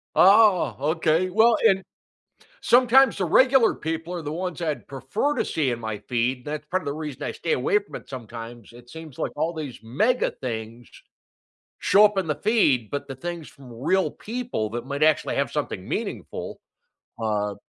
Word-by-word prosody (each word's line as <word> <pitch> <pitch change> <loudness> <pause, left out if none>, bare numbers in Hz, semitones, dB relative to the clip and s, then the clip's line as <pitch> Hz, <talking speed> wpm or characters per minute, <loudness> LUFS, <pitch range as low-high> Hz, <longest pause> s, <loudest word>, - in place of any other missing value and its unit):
Oh, 195 - +5
okay, 160 +4 +1
well 220 +4 +4
and 195 -2 +2 0.8
sometimes 250 0 +5
the 185 - 0
regular 260 +7 +4
people 165 +2 -4
are 170 - -4
the 150 - -5
ones 180 +1 -4
I'd 145 -10 -3
prefer 135 - -2
to - - 0
see 145 -5 0
in 120 -1 -3
my 110 -2 -4
feed- 125 +1 -1
that's 150 0 -5
part 185 +4 -1
of - - -13
the 140 - -1
reason 150 -3 -6
I - - -3
stay - - -3
away 430 -2 +2
from 410 - -10
it - - -12
sometimes- 115 -2 -9
it 120 0 -15
seems 160 -3 -11
like - - -2
all 160 +3 0
these 145 -8 -6
mega 215 - +1
things 115 -1 -7 0.9
show 210 +1 +6
up 205 -1 +1
in 185 - 0
the 150 - 0
feed, 150 - +2
but 140 0 -4
the 135 - -7
things 170 +3 -6
from 130 -3 -14
real 185 +11 0
people 235 - -4
that 120 +1 -5
might 140 +2 -1
actually 155 -1 +2
have - - 0
something - - -4
meaningful, - - -5 0.6
uh, 105 -2 -1
155 Hz, 185 wpm, -24 LUFS, 125-195 Hz, 0.9 s, show